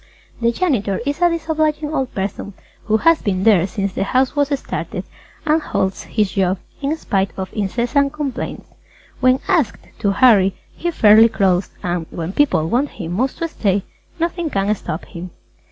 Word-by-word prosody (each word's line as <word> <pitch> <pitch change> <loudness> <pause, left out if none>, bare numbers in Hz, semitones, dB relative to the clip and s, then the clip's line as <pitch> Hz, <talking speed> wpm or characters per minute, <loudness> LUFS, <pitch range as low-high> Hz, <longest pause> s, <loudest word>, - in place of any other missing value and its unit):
The 235 0 +3
janitor 235 - 0
is 285 +4 -2
a 350 - +5
disobliging 310 -2 -1
old 265 -4 -2
person 195 0 -4 0.3
who 220 +1 +3
has 330 +6 +4
been 190 -3 -1
there 195 -5 +5
since 200 -2 -3
the - - -1
house 255 +6 +1
was 285 -1 +2
started - - -5 0.4
and 310 +1 +3
holds 190 -9 -2
his 210 -3 0
job, 190 -1 +1 0.2
in 290 +3 -1
spite 195 -9 0
of 190 -1 -5
incessant 240 +7 0
complaints. 295 -3 -4 0.5
When 255 0 +3
asked 300 - +1
to 205 - +1
hurry, 200 -3 +5 0.2
he 345 - -2
fairly 220 -6 +6
crawls 185 -3 +1
and, 175 -2 -2
when 170 +2 -5
people 270 - +2
want 255 - +1
him 170 -4 -7
most 250 +9 -1
to 335 - -2
stay, 200 - 0 0.4
nothing 335 0 -1
can 200 -3 +1
stop 170 -5 -5
him. 180 +1 -8
225 Hz, 170 wpm, -19 LUFS, 195-290 Hz, 0.5 s, fairly